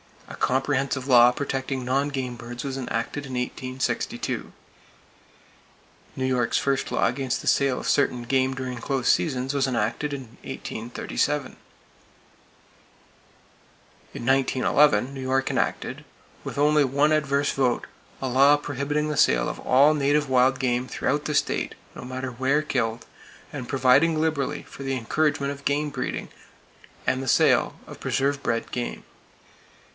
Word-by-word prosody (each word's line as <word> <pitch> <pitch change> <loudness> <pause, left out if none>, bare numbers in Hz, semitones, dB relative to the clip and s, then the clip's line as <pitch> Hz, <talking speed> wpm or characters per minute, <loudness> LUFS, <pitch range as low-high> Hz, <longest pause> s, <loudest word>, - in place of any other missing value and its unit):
A - - -8
comprehensive 135 0 0
law 120 -2 +7
protecting 135 -1 -3
non 135 +3 +1
game 130 -3 -3
birds 120 +1 -7
was 135 -2 -4
enacted 135 +2 -3
in 130 - -8
1862. 130 +1 -3 1.6
New 130 - -2
York's 125 -2 +1
first 135 -1 0
law - - +2
against 125 +2 -1
the - - -9
sale 140 -2 +2
of - - -5
certain 125 -4 +1
game 130 +2 +1
during 125 -2 -5
close 135 0 -2
seasons 135 -3 +1
was 140 -1 +1
enacted 125 +4 -1
in 140 -1 -4 0.2
1837. 130 +4 -3 2.6
In - - -6
1911 135 +1 +3
New 135 - -6
York 130 +1 0
enacted, - - -2 0.4
with - - -6
only 150 +1 +4
one 140 +3 +2
adverse 145 -2 +1
vote, 125 -3 0 0.4
a 135 - -1
law 135 +3 +5
prohibiting 145 +1 -2
the 150 - -2
sale - - +4
of - - -5
all 140 +4 +5
native 145 0 +1
wild 130 0 +3
game 125 -1 0
throughout 145 +3 -1
the 150 - -1
state, - - 0 0.2
no - - -9
matter 130 +1 -5
where 135 +5 +1
killed, 115 -6 -2 0.5
and 130 -5 -6
providing 140 +5 +4
liberally 150 -2 -1
for - - -12
the 135 -1 -2
encouragement 140 +3 0
of 140 0 -9
game 145 +1 0
breeding, - - -4 0.8
and 130 0 +1
the 135 - -5
sale - - +3
of - - -11
preserve 140 +1 0
bred 115 -3 -2
game. 120 -1 -4
135 Hz, 140 wpm, -25 LUFS, 125-145 Hz, 2.6 s, law